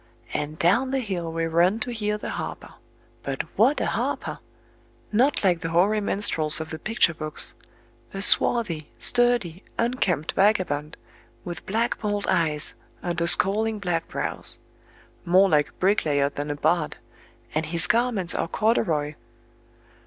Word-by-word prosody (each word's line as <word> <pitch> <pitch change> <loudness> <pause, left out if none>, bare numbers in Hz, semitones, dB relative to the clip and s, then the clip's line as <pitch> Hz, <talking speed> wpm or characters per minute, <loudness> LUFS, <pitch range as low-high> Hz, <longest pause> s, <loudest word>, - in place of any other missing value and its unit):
And 150 +1 -4
down 200 +12 +2
the 270 - -1
hill 185 -9 -4
we 165 0 -2
run 170 +6 +2
to 245 - -2
hear 210 -2 -2
the - - -6
harper... - - -7 0.5
But - - -4
what - - +3
a - - -1
harper! - - -3 0.7
Not 250 +6 +2
like 180 -3 +2
the 165 - -3
hoary 195 +6 +2
minstrels 160 -7 +2
of 160 - -7
the 160 - -6
picture 215 -5 +1
books. 155 -1 -4 0.6
A 195 - -6
swarthy, 180 -10 +3
sturdy, 240 -8 +2 0.2
unkempt 230 - -1
vagabond, 175 -7 0 0.5
with 175 -2 -8
black 225 +4 -1
bold 205 -1 -2
eyes 160 -5 0 0.3
under 170 -1 -1
scowling 215 +5 +4
black 175 -5 -2
brows. - - -4 0.7
More 185 +3 +4
like 150 -5 +2
a - - -24
bricklayer 150 -8 +1
than 145 +1 -6
a 145 - -2
bard,—and 145 -3 -4
his 165 +1 +7
garments 230 -7 +1
are - - -2
corduroy! 160 -9 0
175 Hz, 140 wpm, -24 LUFS, 155-210 Hz, 0.7 s, his